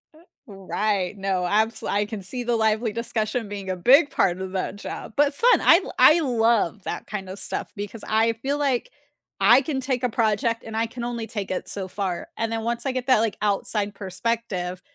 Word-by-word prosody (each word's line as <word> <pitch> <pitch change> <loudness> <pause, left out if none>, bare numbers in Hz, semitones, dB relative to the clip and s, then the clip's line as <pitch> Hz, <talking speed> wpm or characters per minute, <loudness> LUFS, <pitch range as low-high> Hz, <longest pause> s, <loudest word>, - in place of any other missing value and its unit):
Eh, - - -18 0.3
right. 200 -1 -2
No, 190 -1 -1
absol 215 +5 0
I 205 +1 +1
can 210 -1 -6
see 245 +6 -4
the 240 0 0
lively 220 0 +1
discussion 225 0 -2
being 200 -2 -6
a 185 - -1
big 270 - +5
part 180 -6 +1
of 190 0 -5
that 190 +1 -2
job, 205 - -7
but 285 0 +3
fun. 485 +10 +4
l - - -3 0.2
l - - -7
I 315 - +7
love 225 - +1
that - - -5
kind 195 -3 -5
of 190 - -7
stuff - - -5
because 205 +2 -6
I 225 +1 +2
feel 270 +6 -2
like 275 -4 0 0.5
I 230 +7 +6
can 270 -1 -2
take 255 -1 -2
a 250 - +2
project 225 +1 0
and 225 - -7
I 225 +1 0
can 235 +1 -7
only 235 -2 -4
take 205 -3 -4
it 185 - -3
so 190 -2 -3
far, 185 -2 -3
and 225 0 -1
then 225 0 -2
once 235 +3 -2
I 270 - +1
get 255 0 -4
that, 255 -4 +5
like, 225 -1 0
outside 205 0 -1
perspective, 190 -2 -3
220 Hz, 215 wpm, -24 LUFS, 200-240 Hz, 0.5 s, I